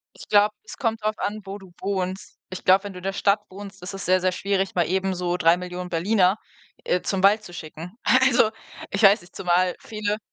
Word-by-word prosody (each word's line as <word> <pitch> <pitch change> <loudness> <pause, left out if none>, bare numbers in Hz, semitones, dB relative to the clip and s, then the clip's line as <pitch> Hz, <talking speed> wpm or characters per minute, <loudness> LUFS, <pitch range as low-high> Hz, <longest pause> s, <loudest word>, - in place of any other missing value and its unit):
Ich - - -13
glaube, 210 0 +4
es - - -10
kommt 225 -4 -1
drauf 215 0 -1
an, 210 +1 -3
wo 195 +1 -6
du 190 -3 -15
wohnst. 190 -1 -3
Ich 185 -1 -8
glaube, 190 +2 +5
wenn 205 - -6
du - - -10
in - - -15
der 195 0 -2
Stadt 200 +1 +2
wohnst, 195 0 -10
ist 180 +2 -7
es 195 - -6
sehr, 185 +1 +4
sehr 185 0 0
schwierig, 195 0 -1
mal 175 -2 +2
eben 190 +1 0
so 175 0 -1
3.000.000 180 +1 +1
Berliner, 185 +3 +2 0.5
äh, 180 - 0
zum 190 -1 -2
Wald 210 +2 +5
zu 175 - -11
schicken. 170 +3 -9
Also, 255 -4 +4 0.4
ich 195 - -2
weiß 200 +2 +7
nicht, 175 - -19
zumal 180 0 +1
viele 210 -1 -3
195 Hz, 220 wpm, -24 LUFS, 180-205 Hz, 0.5 s, weiß